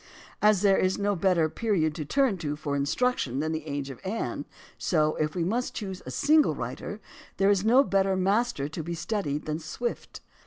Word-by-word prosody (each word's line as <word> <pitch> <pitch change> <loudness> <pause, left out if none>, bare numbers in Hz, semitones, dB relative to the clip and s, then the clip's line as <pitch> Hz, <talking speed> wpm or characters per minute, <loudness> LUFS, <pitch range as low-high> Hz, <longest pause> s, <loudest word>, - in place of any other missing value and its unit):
As 210 -2 +4
there 195 -1 +5
is 185 0 +1
no 205 0 0
better 175 -3 +2
period 165 -4 0
to 155 -2 -5
turn 255 - +1
to 150 -3 -2
for 145 -1 -3
instruc 250 - +1
tion 130 +1 -2
than 155 +2 -1
the 160 -1 -4
age 140 -1 -3
of 130 - -10
Anne, 215 +4 -3 0.3
so, 155 -3 +1
if 155 0 -1
we 175 - 0
must 235 +8 -1
choose 190 -4 -5
a - - -4
single 300 - +3
writer, - - -5 0.4
there 195 +1 +4
is 200 -2 +2
no 245 +5 +6
better 195 -5 +2
master 195 - +1
to 160 +2 -5
be 170 +2 -4
studied 160 -5 -2
than 155 +1 -2
Swift. 200 +10 -5
180 Hz, 200 wpm, -27 LUFS, 155-210 Hz, 0.4 s, no